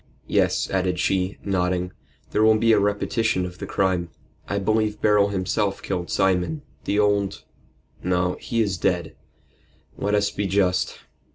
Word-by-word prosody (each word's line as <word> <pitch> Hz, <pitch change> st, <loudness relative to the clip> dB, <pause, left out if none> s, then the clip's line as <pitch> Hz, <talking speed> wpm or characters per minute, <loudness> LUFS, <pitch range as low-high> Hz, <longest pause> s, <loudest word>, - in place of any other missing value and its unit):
Yes," -, -, +1 dB
added 95 Hz, -1 st, 0 dB
she, 95 Hz, +1 st, 0 dB
nodding, 90 Hz, -2 st, 0 dB, 0.4 s
"there 105 Hz, -, +1 dB
will 110 Hz, 0 st, +6 dB
be 115 Hz, +1 st, +3 dB
a 110 Hz, -, +5 dB
repetition 105 Hz, -1 st, 0 dB
of 90 Hz, 0 st, -8 dB
the -, -, -5 dB
crime. 90 Hz, -3 st, 0 dB, 0.4 s
I 100 Hz, -, 0 dB
believe 105 Hz, +1 st, 0 dB
Beryl 105 Hz, -1 st, +4 dB
himself 100 Hz, +1 st, -1 dB
killed 90 Hz, -3 st, -3 dB
Simon 90 Hz, -5 st, +1 dB, 0.2 s
the 100 Hz, -, 0 dB
old 100 Hz, -1 st, +1 dB, 0.6 s
no, 90 Hz, 0 st, 0 dB
he 115 Hz, -1 st, 0 dB
is 95 Hz, -4 st, -2 dB
dead. 85 Hz, -2 st, 0 dB, 0.8 s
Let 105 Hz, +1 st, 0 dB
us 100 Hz, 0 st, +1 dB
be 100 Hz, -1 st, -2 dB
just." 95 Hz, -1 st, +1 dB
100 Hz, 150 wpm, -24 LUFS, 90-105 Hz, 0.8 s, will